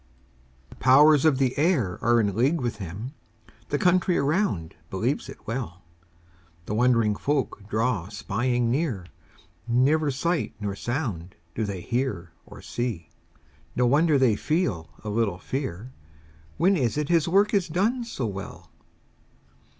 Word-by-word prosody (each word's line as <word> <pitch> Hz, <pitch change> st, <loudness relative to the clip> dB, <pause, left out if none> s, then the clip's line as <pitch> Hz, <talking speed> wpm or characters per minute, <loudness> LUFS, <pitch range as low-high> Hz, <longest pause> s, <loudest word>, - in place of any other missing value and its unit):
The -, -, -14 dB
powers 145 Hz, +3 st, +6 dB
of 150 Hz, -4 st, +4 dB
the 130 Hz, -2 st, +1 dB
air 140 Hz, -, +1 dB
are 120 Hz, 0 st, +4 dB
in 100 Hz, -4 st, 0 dB
league 135 Hz, +9 st, +2 dB
with 120 Hz, -4 st, -2 dB
him; 100 Hz, -, -7 dB, 0.6 s
The 145 Hz, -, +1 dB
country 180 Hz, +1 st, +3 dB
around 140 Hz, -, 0 dB, 0.2 s
believes 115 Hz, +10 st, -2 dB
it -, -, -12 dB
well; 105 Hz, -7 st, -5 dB, 0.8 s
The 105 Hz, -, -4 dB
wondering 115 Hz, -2 st, +3 dB
folk 130 Hz, -6 st, -2 dB
draw 110 Hz, -5 st, 0 dB
spying 115 Hz, +4 st, -1 dB
near; 125 Hz, -, -1 dB, 0.6 s
Never 140 Hz, +6 st, +3 dB
sight 165 Hz, +5 st, -1 dB
nor 100 Hz, -2 st, -3 dB
sound 105 Hz, -, -4 dB, 0.2 s
do 110 Hz, -, -2 dB
they 100 Hz, -3 st, -4 dB
see 120 Hz, +2 st, 0 dB, 0.4 s
or -, -, -12 dB
hear; 115 Hz, -9 st, -4 dB, 0.7 s
No 125 Hz, -, +2 dB
wonder 150 Hz, +4 st, +4 dB
they 130 Hz, -5 st, +3 dB
feel 105 Hz, -, -1 dB
a 105 Hz, -, -4 dB
little 105 Hz, -4 st, 0 dB
fear; 130 Hz, +1 st, -5 dB, 0.6 s
When 185 Hz, +5 st, +4 dB
is 125 Hz, -, 0 dB
it 150 Hz, -1 st, -1 dB
his 170 Hz, -2 st, +3 dB
work 200 Hz, +5 st, +3 dB
is 195 Hz, -3 st, +2 dB
done 210 Hz, +10 st, 0 dB
so 180 Hz, -, -4 dB
well? 100 Hz, -2 st, -7 dB
125 Hz, 140 wpm, -25 LUFS, 105-150 Hz, 0.8 s, powers